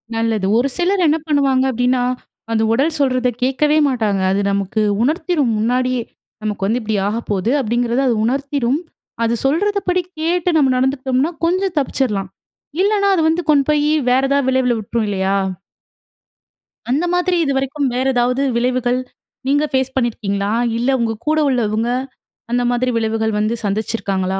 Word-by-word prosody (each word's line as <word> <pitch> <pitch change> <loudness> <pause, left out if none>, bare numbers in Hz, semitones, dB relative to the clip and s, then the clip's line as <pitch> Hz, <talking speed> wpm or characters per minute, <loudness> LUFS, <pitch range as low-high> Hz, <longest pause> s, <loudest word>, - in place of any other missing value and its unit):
நல்லது. 225 -3 0
ஒரு 245 +3 +2
சிலர் 365 +1 +2
என்ன 305 +1 +3
பண்ணுவாங்க 275 -3 +2
அப்டினா, 245 +1 +1 0.5
அந்த 220 -1 +1
உடல் 290 +7 +1
சொல்றத 255 -2 +1 0.2
கேட்கவே 295 +4 +2
மாட்டாங்க. 215 -7 0
அது 195 +1 +1
நமக்கு 200 +2 -1 0.2
உணர்த்திரும் 300 -1 +1
முன்னாடியே. 250 +2 0 0.4
நமக்கு 210 -2 -2
வந்து, 230 +4 +1
இப்டி 220 -1 -2
ஆகப்போது, 210 -1 -1
அப்டிங்கறத 240 +1 0
அது 240 - +2
உணர்த்திரும். 275 +1 0 0.5
அது 230 - +1
சொல்றதபடி 365 +4 +1 0.2
கேட்டு, 345 +2 0
நம்ம 275 -4 +3
நடந்துகிட்டோம்னா, 265 +3 0
கொஞ்ச 370 +3 +1
தப்புச்சுரலாம். 230 -9 -1 0.5
இல்லனா, 400 0 +2
அது 340 - +1
வந்து 325 +2 +1
கொண்டு 280 -2 +3
போயி, 300 0 +2 0.2
வேற 255 +1 +4
ஏதாவது 280 -1 +1
விளைவுல 260 -2 +2
விட்ரும், 220 +2 -2
இல்லையா? 195 0 0 1.5
அந்த 290 +7 +1
மாதிரி 355 0 +1
இதுவரைக்கும் 275 +1 -1
வேற 255 +1 -1
ஏதாவது 250 +2 +1
விளைவுகள் 250 +1 +1 0.5
நீங்க 290 +2 +2
ஃபேஸ் 265 -1 0
பண்ணியிருக்கீங்களா? 205 -5 -1 0.3
இல்ல 240 +3 0
உங்க 225 -1 0
கூட 310 +1 +2
உள்ளவங்க, 225 -2 0 0.6
அந்த 245 0 +2
மாதிரி 245 +1 0
விளைவுகள் 220 -1 -1
வந்து 215 +2 0
சந்திச்சிருக்காங்களா? 195 -2 -1
255 Hz, 140 wpm, -18 LUFS, 225-285 Hz, 1.5 s, வேற